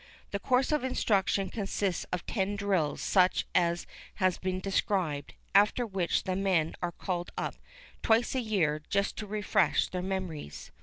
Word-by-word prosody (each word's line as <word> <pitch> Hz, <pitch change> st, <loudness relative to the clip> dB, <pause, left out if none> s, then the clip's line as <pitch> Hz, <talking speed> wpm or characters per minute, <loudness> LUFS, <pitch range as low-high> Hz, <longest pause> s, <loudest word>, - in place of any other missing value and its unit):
The 200 Hz, -, -2 dB
course 250 Hz, +6 st, +2 dB
of 300 Hz, -3 st, +1 dB
instruction 200 Hz, -6 st, +1 dB
consists 195 Hz, -3 st, -1 dB
of 180 Hz, -1 st, -3 dB
ten 200 Hz, -1 st, -1 dB
drills 195 Hz, -7 st, 0 dB
such 185 Hz, -2 st, +3 dB
as 170 Hz, -1 st, +2 dB, 0.3 s
has 185 Hz, -3 st, +1 dB
been 185 Hz, 0 st, -2 dB
described, 185 Hz, -7 st, -1 dB, 0.2 s
after 210 Hz, +4 st, +4 dB
which 190 Hz, -5 st, 0 dB
the 185 Hz, -, -1 dB
men 185 Hz, -5 st, +1 dB
are 175 Hz, -1 st, -1 dB
called 175 Hz, -1 st, -3 dB
up -, -, -2 dB, 0.5 s
twice 225 Hz, +1 st, +3 dB
a 260 Hz, -, 0 dB
year, 170 Hz, -10 st, +1 dB
just 200 Hz, 0 st, +1 dB
to 215 Hz, -, -5 dB
refresh 210 Hz, 0 st, +2 dB
their 180 Hz, -, -3 dB
memories. 180 Hz, -, -5 dB
190 Hz, 155 wpm, -30 LUFS, 175-205 Hz, 0.5 s, after